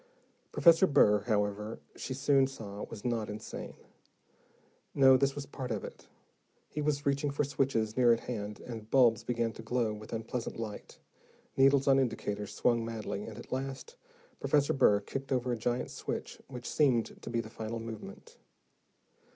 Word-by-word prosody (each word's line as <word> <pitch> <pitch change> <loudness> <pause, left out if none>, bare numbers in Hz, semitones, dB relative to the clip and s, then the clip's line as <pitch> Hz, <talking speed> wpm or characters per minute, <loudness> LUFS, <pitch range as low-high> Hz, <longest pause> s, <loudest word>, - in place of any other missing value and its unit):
Professor 170 +2 +6
Burr, 105 - +5
however, 105 0 -1 0.2
she 130 - -5
soon 135 0 +3
saw, 105 -6 -8
was 110 -1 -10
not 115 -3 -1
insane. 105 +1 -7 1.2
No, 135 -1 +7
this 135 +1 +2
was 145 -1 -5
part 130 -2 -6
of 110 -4 -2
it. - - -10 0.6
He 150 - -4
was 145 -1 0
reaching 140 +1 +1
for 140 +1 0
switches 130 -6 0
near 125 -2 +5
at 115 - +2
hand, 105 -3 -5
and 110 -3 -8
bulbs 120 -4 +4
began 115 -2 -1
to - - -9
glow 115 -1 0
with 105 0 -10
unpleasant 115 +1 -4
light, 110 -2 -7 0.6
needles 135 0 +4
on 135 0 +6
indicators 105 -5 -2
swung 120 -2 +1
madly, 110 -2 -4
and 110 -2 -8
at 120 - -11
last, 135 - -4 0.4
Professor 145 -1 +2
Burr 105 -6 +4
kicked 135 +6 -6
over 125 -1 +1
a - - +1
giant 120 +2 -2
switch, - - -5
which 125 -2 -8
seemed 130 -7 +1
to - - -7
be 115 - 0
the 110 -1 -5
final 115 +1 -5
movement. 195 - -9
120 Hz, 165 wpm, -31 LUFS, 110-135 Hz, 1.2 s, No